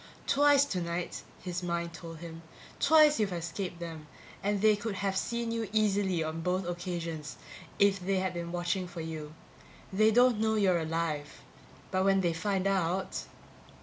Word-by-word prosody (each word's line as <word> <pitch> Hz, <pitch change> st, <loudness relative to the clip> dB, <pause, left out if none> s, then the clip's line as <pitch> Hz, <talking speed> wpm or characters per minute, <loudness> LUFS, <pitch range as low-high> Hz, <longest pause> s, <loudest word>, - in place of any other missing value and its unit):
Twice 285 Hz, 0 st, +5 dB
tonight, 175 Hz, -6 st, -3 dB, 0.2 s
his 180 Hz, -1 st, -3 dB
mind 170 Hz, -1 st, -2 dB
told 165 Hz, -1 st, -8 dB
him, 165 Hz, -1 st, -8 dB, 0.4 s
twice 305 Hz, -1 st, +6 dB
you've 210 Hz, -3 st, +1 dB
escaped 175 Hz, +1 st, -4 dB
them 165 Hz, -3 st, -7 dB, 0.3 s
and 205 Hz, +1 st, 0 dB
they 215 Hz, +1 st, +5 dB
could 205 Hz, 0 st, -4 dB
have 195 Hz, 0 st, -1 dB
seen 235 Hz, +3 st, -1 dB
you 230 Hz, -3 st, -2 dB
easily 200 Hz, -5 st, +2 dB
on 160 Hz, +1 st, -4 dB
both 180 Hz, +1 st, -1 dB
occasions 170 Hz, -4 st, -4 dB, 0.4 s
if 200 Hz, -1 st, +4 dB
they 190 Hz, +2 st, -1 dB
had 185 Hz, -1 st, -1 dB
been 170 Hz, -1 st, -4 dB
watching 175 Hz, +1 st, -1 dB
for 175 Hz, -1 st, -7 dB
you. 155 Hz, -1 st, -6 dB, 0.6 s
They 215 Hz, +3 st, +5 dB
don't 245 Hz, 0 st, +4 dB
know 220 Hz, 0 st, +2 dB
you're 190 Hz, -5 st, +3 dB
alive. 160 Hz, -2 st, -3 dB, 0.5 s
But 185 Hz, 0 st, +1 dB
when 195 Hz, 0 st, +4 dB
they 170 Hz, -2 st, +1 dB
find 195 Hz, +2 st, -1 dB
out 190 Hz, -1 st, 0 dB
185 Hz, 160 wpm, -30 LUFS, 170-205 Hz, 0.6 s, twice